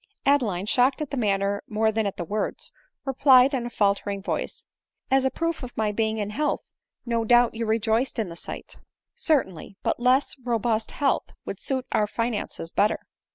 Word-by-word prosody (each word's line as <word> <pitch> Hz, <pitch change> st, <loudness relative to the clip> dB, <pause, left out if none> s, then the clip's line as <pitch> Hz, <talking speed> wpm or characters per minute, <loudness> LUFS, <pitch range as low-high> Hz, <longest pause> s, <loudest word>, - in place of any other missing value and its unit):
Adeline, 230 Hz, -10 st, +2 dB
shocked 255 Hz, +5 st, +3 dB
at 305 Hz, -3 st, -4 dB
the -, -, -2 dB
manner 200 Hz, -4 st, 0 dB
more 220 Hz, +1 st, +1 dB
than 220 Hz, -1 st, 0 dB
at 195 Hz, -, -4 dB
the 175 Hz, -, -2 dB
words, 210 Hz, +5 st, -3 dB, 0.3 s
replied 270 Hz, 0 st, +5 dB
in 240 Hz, -3 st, -1 dB
a -, -, -5 dB
faltering 200 Hz, -2 st, 0 dB
voice, 195 Hz, -, -4 dB, 0.5 s
"As 270 Hz, 0 st, +4 dB
a -, -, +4 dB
proof 330 Hz, +3 st, -2 dB
of 250 Hz, -2 st, -8 dB
my 215 Hz, -1 st, +1 dB
being 220 Hz, +1 st, 0 dB
in 205 Hz, -1 st, -2 dB
health, 295 Hz, +6 st, -2 dB, 0.3 s
no 230 Hz, -1 st, 0 dB
doubt 240 Hz, +1 st, +5 dB
you 225 Hz, 0 st, -3 dB
rejoiced 225 Hz, +4 st, +1 dB
in 220 Hz, -3 st, 0 dB
the 170 Hz, -, -8 dB
sight. -, -, -8 dB, 0.2 s
" -, -, -64 dB
Certainly; 195 Hz, -, -1 dB
but -, -, 0 dB
less 255 Hz, +3 st, +3 dB
robust 230 Hz, -2 st, 0 dB
health 285 Hz, -2 st, 0 dB
would -, -, -5 dB
suit 260 Hz, -2 st, -2 dB
our 210 Hz, -, +2 dB
finan 230 Hz, 0 st, -2 dB
ces 165 Hz, -, -7 dB
better." 210 Hz, +1 st, +2 dB
230 Hz, 190 wpm, -25 LUFS, 210-260 Hz, 0.5 s, replied